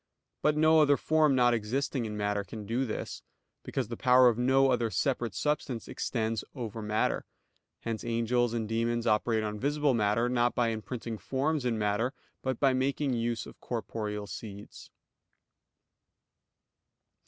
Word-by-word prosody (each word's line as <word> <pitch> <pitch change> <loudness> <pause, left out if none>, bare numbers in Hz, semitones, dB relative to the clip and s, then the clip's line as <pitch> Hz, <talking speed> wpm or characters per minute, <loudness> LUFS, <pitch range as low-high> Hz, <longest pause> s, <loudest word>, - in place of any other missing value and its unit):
But 150 0 +2
no 155 +1 +5
other 145 -2 +4
form 155 -3 +3
not 120 -1 +4
existing 120 +3 -1
in 105 -1 -4
matter 105 0 0
can 105 +2 -8
do 120 +5 0
this; 110 - -5 0.4
because - - -3
the 115 - -5
power 125 +1 +6
of 115 - -1
no 135 +2 +4
other 120 -2 +1
separate 120 -4 -1
substance 145 -6 -2
extends 115 -2 -2
over 115 -4 -5
matter. 105 0 0 0.6
Hence 115 -2 -4
angels 120 +1 +1
and 110 -2 -2
demons 115 +1 0
operate 110 0 +2
on 105 0 -3
visible 145 +1 +1
matter; 115 +1 +2
not 120 -1 +1
by 120 -2 +2
imprinting 115 0 -5
forms 140 +1 -1
in 120 -2 +1
matter, 105 +5 0 0.3
but 130 -3 -2
by 135 -2 +4
making 135 +1 0
use 115 0 -1
of - - -13
corporeal 105 -3 -4
seeds. 100 0 -9
120 Hz, 150 wpm, -30 LUFS, 110-130 Hz, 0.6 s, power